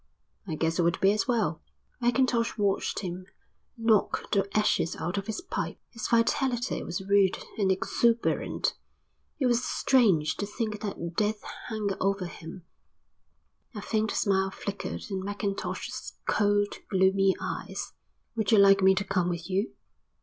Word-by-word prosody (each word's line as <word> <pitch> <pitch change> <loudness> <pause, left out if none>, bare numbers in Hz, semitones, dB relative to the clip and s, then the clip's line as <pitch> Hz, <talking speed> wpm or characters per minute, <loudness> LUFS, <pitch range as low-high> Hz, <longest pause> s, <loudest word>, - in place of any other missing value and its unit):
"I 160 - -2
guess 165 +2 0
it - - +5
would 170 0 +1
be 195 - +5
as 215 +4 0
well." 215 - 0 0.4
Mackintosh 240 -1 +2
watched 200 -2 0
him 185 -1 -5 0.5
knock 225 -3 +1
the 195 -1 +1
ashes 210 -5 +2
out 180 +4 -2
of 195 - -8
his 220 - -3
pipe. 370 - -4
His 230 -2 -4
vitality 240 +2 +1
was 175 +3 -4
rude 200 -2 +4 0.2
and 195 -2 +3
exuberant. 230 +5 +1 0.6
It 270 - 0
was 245 0 +2
strange 190 - +3
to 205 - -3
think 210 -1 -3
that 170 -5 -5
death 210 +1 0 0.2
hung 215 -3 -2
over 195 -1 +1
him. 170 0 -9 1.1
A 210 - -5
faint 220 -1 0
smile 195 -2 +1
flickered 200 +1 -5
in 190 -1 -2
Mackintosh's 200 0 -4
cold, 205 -1 +1
gloomy 190 0 +3
eyes. - - -5 0.4
"Would 220 -2 0
you 220 - +6
like 195 0 +7
me 190 0 +6
to 195 - 0
come 180 -2 0
with 170 +1 -4
you?" 195 +4 0
200 Hz, 150 wpm, -28 LUFS, 190-220 Hz, 1.1 s, like